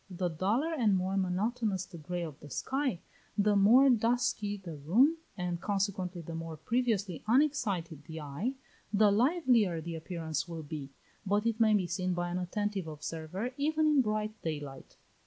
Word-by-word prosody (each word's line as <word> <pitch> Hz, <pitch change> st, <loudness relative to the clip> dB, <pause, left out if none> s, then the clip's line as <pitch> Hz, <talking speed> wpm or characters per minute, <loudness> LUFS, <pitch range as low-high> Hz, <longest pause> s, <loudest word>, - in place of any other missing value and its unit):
The 180 Hz, -1 st, -2 dB
duller 215 Hz, -, 0 dB
and 225 Hz, -10 st, +3 dB
more 185 Hz, +1 st, 0 dB
monotonous 195 Hz, +1 st, 0 dB
the 170 Hz, -3 st, -11 dB
grey 175 Hz, +3 st, -3 dB
of 155 Hz, -4 st, -7 dB
the 150 Hz, -, -11 dB
sky, 265 Hz, -, -1 dB, 0.4 s
the 205 Hz, 0 st, +3 dB
more 230 Hz, +8 st, +7 dB
dusky 230 Hz, -4 st, +2 dB
the 185 Hz, -4 st, -8 dB
room, 225 Hz, -, +3 dB, 0.2 s
and, 175 Hz, -1 st, -2 dB
consequently, 190 Hz, -3 st, -1 dB
the 165 Hz, -, -7 dB
more 165 Hz, -1 st, -5 dB
previously 210 Hz, -2 st, -1 dB
unexcited 210 Hz, -, +1 dB
the 160 Hz, +1 st, -7 dB
eye, 155 Hz, -, -3 dB, 0.4 s
the 210 Hz, 0 st, +5 dB
livelier 235 Hz, -, +3 dB
the 165 Hz, +1 st, -5 dB
appearance 160 Hz, 0 st, -3 dB
will 165 Hz, -2 st, -6 dB
be; 145 Hz, -2 st, -6 dB, 0.3 s
but 205 Hz, +2 st, +1 dB
it 230 Hz, -1 st, 0 dB
may 220 Hz, -2 st, +5 dB
be 195 Hz, -3 st, +2 dB
seen 180 Hz, +1 st, -1 dB
by 175 Hz, 0 st, -1 dB
an 180 Hz, -, -1 dB
attentive 195 Hz, 0 st, -2 dB
observer 160 Hz, -, -5 dB
even 310 Hz, +2 st, +2 dB
in 300 Hz, -3 st, +5 dB
bright 215 Hz, -2 st, -1 dB
daylight. 145 Hz, -4 st, -6 dB
195 Hz, 165 wpm, -31 LUFS, 170-225 Hz, 0.4 s, more